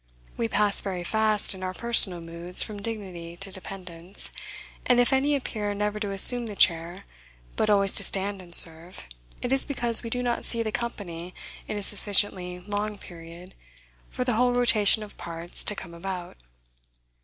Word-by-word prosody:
We 115 Hz, -, -2 dB
pass 205 Hz, -, +2 dB
very 185 Hz, -3 st, -5 dB
fast, 215 Hz, +2 st, +1 dB
in 190 Hz, -, -11 dB
our 185 Hz, 0 st, -5 dB
personal 205 Hz, -7 st, +4 dB
moods, 170 Hz, +2 st, 0 dB
from 210 Hz, -2 st, -8 dB
dignity 185 Hz, -6 st, -7 dB
to 195 Hz, +1 st, -4 dB
dependence. 185 Hz, -1 st, -2 dB, 0.5 s
And 245 Hz, -1 st, +2 dB
if 245 Hz, +2 st, +2 dB
any 280 Hz, +2 st, +2 dB
appear 210 Hz, -6 st, -4 dB
never 210 Hz, +1 st, -2 dB
to 210 Hz, -2 st, -3 dB
assume 235 Hz, +5 st, +7 dB
the 210 Hz, -, -8 dB
chair, 170 Hz, +1 st, +2 dB, 0.5 s
but 215 Hz, -, 0 dB
always 200 Hz, -2 st, +4 dB
to -, -, +1 dB
stand 195 Hz, 0 st, 0 dB
and 175 Hz, -1 st, -6 dB
serve, 165 Hz, -, 0 dB, 0.4 s
it 245 Hz, -, -3 dB
is 270 Hz, 0 st, +5 dB
because 240 Hz, -5 st, +1 dB
we 230 Hz, -, -6 dB
do 250 Hz, +2 st, -1 dB
not 240 Hz, -1 st, -2 dB
see 230 Hz, -1 st, +2 dB
the 220 Hz, -, -4 dB
company 185 Hz, -7 st, -6 dB, 0.3 s
in 210 Hz, -, -4 dB
a 205 Hz, -, -4 dB
sufficiently 190 Hz, -3 st, -1 dB
long 205 Hz, +2 st, -4 dB
period 170 Hz, +1 st, -12 dB, 0.6 s
for -, -, -4 dB
the 250 Hz, -1 st, -1 dB
whole 245 Hz, +2 st, +2 dB
rotation 220 Hz, -3 st, +3 dB
of 210 Hz, -, -13 dB
parts 170 Hz, 0 st, -4 dB
to 210 Hz, -, -2 dB
come 175 Hz, -3 st, -10 dB
about. 180 Hz, +1 st, -7 dB
200 Hz, 175 wpm, -25 LUFS, 180-220 Hz, 0.6 s, assume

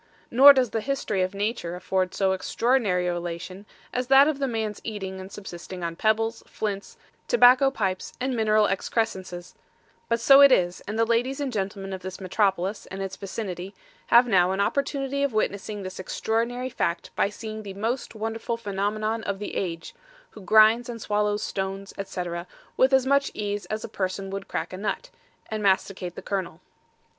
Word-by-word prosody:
Nor 270 Hz, +4 st, +10 dB
does 255 Hz, -4 st, +1 dB
the 225 Hz, -, -1 dB
History 265 Hz, -7 st, -1 dB
of 185 Hz, +2 st, -1 dB
Nature 205 Hz, -4 st, -2 dB
afford 185 Hz, 0 st, -1 dB
so 190 Hz, -1 st, +2 dB
extraordinary 200 Hz, -1 st, +1 dB
a 175 Hz, -, 0 dB
relation 175 Hz, +3 st, -6 dB, 0.3 s
as 250 Hz, 0 st, -1 dB
that 270 Hz, +2 st, +7 dB
of 305 Hz, -3 st, -1 dB
the 275 Hz, -, 0 dB
man's 220 Hz, -3 st, -3 dB
eating 190 Hz, -3 st, -5 dB
and 190 Hz, +1 st, -10 dB
subsisting 180 Hz, -2 st, -8 dB
on 170 Hz, 0 st, -3 dB
pebbles, 225 Hz, +3 st, +1 dB
flints, 200 Hz, -2 st, -4 dB, 0.3 s
tobacco 265 Hz, -, +6 dB
pipes 190 Hz, -8 st, -2 dB
and 255 Hz, 0 st, -1 dB
mineral 215 Hz, -1 st, +3 dB
excrescences; 190 Hz, -3 st, -2 dB, 0.6 s
but 230 Hz, 0 st, +2 dB
so 275 Hz, +4 st, +7 dB
it 280 Hz, -1 st, +9 dB
is 175 Hz, -6 st, +2 dB
and 210 Hz, +2 st, -3 dB
the 230 Hz, -, +3 dB
Ladies 245 Hz, +4 st, 0 dB
and 275 Hz, -3 st, -2 dB
Gentlemen 195 Hz, -1 st, -3 dB
of 190 Hz, -, -6 dB
this 185 Hz, 0 st, -7 dB
Metropolis 195 Hz, 0 st, 0 dB
and 190 Hz, -, -7 dB
its 195 Hz, -1 st, -4 dB
vicinity 195 Hz, -2 st, -6 dB, 0.3 s
have 240 Hz, +1 st, +6 dB
now 185 Hz, -4 st, +4 dB
an 190 Hz, -, -2 dB
opportunity 280 Hz, +3 st, 0 dB
of 280 Hz, -4 st, 0 dB
witnessing 205 Hz, -1 st, -2 dB
this 185 Hz, 0 st, -7 dB
extraordinary 235 Hz, +6 st, -2 dB
Fact 170 Hz, -5 st, -2 dB
by -, -, +2 dB
seeing 215 Hz, +1 st, -7 dB
the 200 Hz, -2 st, -8 dB
Most 230 Hz, +4 st, -3 dB
Wonderful 225 Hz, +1 st, -3 dB
Phenomenon 215 Hz, +1 st, -2 dB
of 200 Hz, -, -2 dB
the 205 Hz, -, -6 dB
Age, 165 Hz, -3 st, -4 dB, 0.4 s
who 215 Hz, -, -12 dB
Grinds 220 Hz, +4 st, +5 dB
and 235 Hz, -1 st, -5 dB
Swallows 210 Hz, 0 st, 0 dB
stones, 195 Hz, 0 st, -4 dB
etc., 180 Hz, -3 st, -4 dB, 0.3 s
with 260 Hz, +1 st, +4 dB
as 265 Hz, -1 st, +4 dB
much 280 Hz, +1 st, +3 dB
ease 205 Hz, -1 st, -3 dB
as 215 Hz, 0 st, -4 dB
a -, -, -4 dB
Person 190 Hz, 0 st, -3 dB
would 195 Hz, 0 st, -5 dB
crack -, -, -4 dB
a -, -, -5 dB
nut, 215 Hz, -, -3 dB, 0.4 s
and 215 Hz, -1 st, -2 dB
masticate 190 Hz, -2 st, 0 dB
the -, -, -8 dB
kernel. 190 Hz, -3 st, -3 dB
210 Hz, 180 wpm, -25 LUFS, 190-235 Hz, 0.6 s, Nor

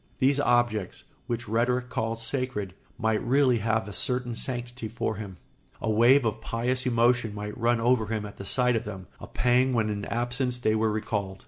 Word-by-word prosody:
These 140 Hz, +1 st, +3 dB
objects, 120 Hz, -7 st, +1 dB, 0.2 s
which 120 Hz, -1 st, -3 dB
rhetoric 120 Hz, +3 st, 0 dB
calls 115 Hz, -1 st, -2 dB
sacred, 125 Hz, -8 st, -3 dB, 0.2 s
might 110 Hz, -1 st, 0 dB
really 130 Hz, -1 st, +3 dB
have 110 Hz, -1 st, 0 dB
a 105 Hz, -, -7 dB
certain 125 Hz, +2 st, -2 dB
sanctity 120 Hz, -1 st, -3 dB
for 110 Hz, -1 st, -3 dB
him; 100 Hz, -4 st, -7 dB, 0.4 s
a 110 Hz, -, -1 dB
wave 120 Hz, +5 st, +5 dB
of 110 Hz, -1 st, -1 dB
pious 125 Hz, +3 st, -1 dB
emotion 120 Hz, -2 st, +2 dB
might 105 Hz, 0 st, -5 dB
run 120 Hz, 0 st, +1 dB
over 115 Hz, -1 st, +2 dB
him 110 Hz, -1 st, -2 dB
at 105 Hz, -, -10 dB
the -, -, -7 dB
sight 125 Hz, +4 st, +2 dB
of 110 Hz, -, 0 dB
them, 95 Hz, -3 st, -7 dB
a -, -, -9 dB
pang 125 Hz, +1 st, +2 dB
when 110 Hz, -3 st, +1 dB
in 100 Hz, 0 st, -4 dB
absence 125 Hz, +1 st, -1 dB
they 110 Hz, -3 st, +1 dB
were 110 Hz, 0 st, +1 dB
recalled. 105 Hz, -3 st, -3 dB
115 Hz, 190 wpm, -27 LUFS, 110-125 Hz, 0.4 s, wave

